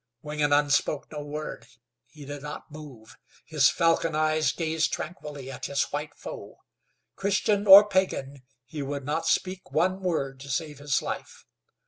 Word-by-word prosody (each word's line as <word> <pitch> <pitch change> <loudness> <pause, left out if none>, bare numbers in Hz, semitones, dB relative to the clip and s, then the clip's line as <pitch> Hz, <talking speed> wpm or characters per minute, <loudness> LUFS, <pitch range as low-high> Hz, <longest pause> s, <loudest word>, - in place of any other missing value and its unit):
Wingenund 145 -1 +1
spoke 140 +1 0
no 150 -1 -5
word. 150 +1 -6 0.4
He 150 -2 -13
did 145 0 -7
not 150 +1 -8
move. 140 -8 -12 0.3
His - - +4
falcon 165 -1 +1
eyes 155 0 +2
gazed 160 -1 -1
tranquilly 150 -5 -6
at 125 - -6
his 140 0 +1
white 150 +1 -4
foe. - - -9 0.6
Christian 205 +1 0
or 200 +2 +11
pagan, 145 -9 -1 0.2
he 145 +4 -7
would 140 0 -4
not 155 +3 -2
speak 185 0 -1
one 185 +4 +1
word 140 -7 -2
to 140 +1 -10
save 145 +1 -3
his 145 -2 0
life. - - -6
150 Hz, 150 wpm, -27 LUFS, 140-165 Hz, 0.6 s, or